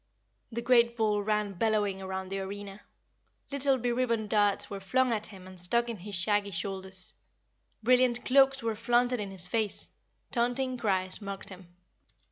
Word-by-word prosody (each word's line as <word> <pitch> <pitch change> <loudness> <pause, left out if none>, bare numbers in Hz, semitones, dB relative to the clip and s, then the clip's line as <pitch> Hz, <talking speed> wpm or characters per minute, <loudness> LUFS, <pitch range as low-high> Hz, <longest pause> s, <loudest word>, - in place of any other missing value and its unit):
The 235 +1 -4
great 235 -1 +4
bull 210 -2 +1
ran 210 -1 -1
bellowing 205 -1 0
around 190 0 -5
the 195 0 -3
arena; 200 +1 -7 0.7
little 275 -1 +2
beribboned 235 -3 -1
darts 205 -2 +2
were 200 - -6
flung 255 +6 +1
at 215 -1 -3
him 190 -3 -12
and 185 -1 -9
stuck 235 +7 +2
in 230 - -4
his 200 +2 -6
shaggy 205 +2 +1
shoulders; 190 0 -4 0.7
brilliant 250 0 +3
cloaks 270 0 +4
were 225 -1 0
flaunted 240 +2 +2
in 205 -1 -3
his 190 -2 +6
face; 215 +2 0 0.4
taunting 245 +2 0
cries 190 -4 -1
mocked 200 -1 -6
him. 180 -2 -13
210 Hz, 155 wpm, -29 LUFS, 195-240 Hz, 0.7 s, his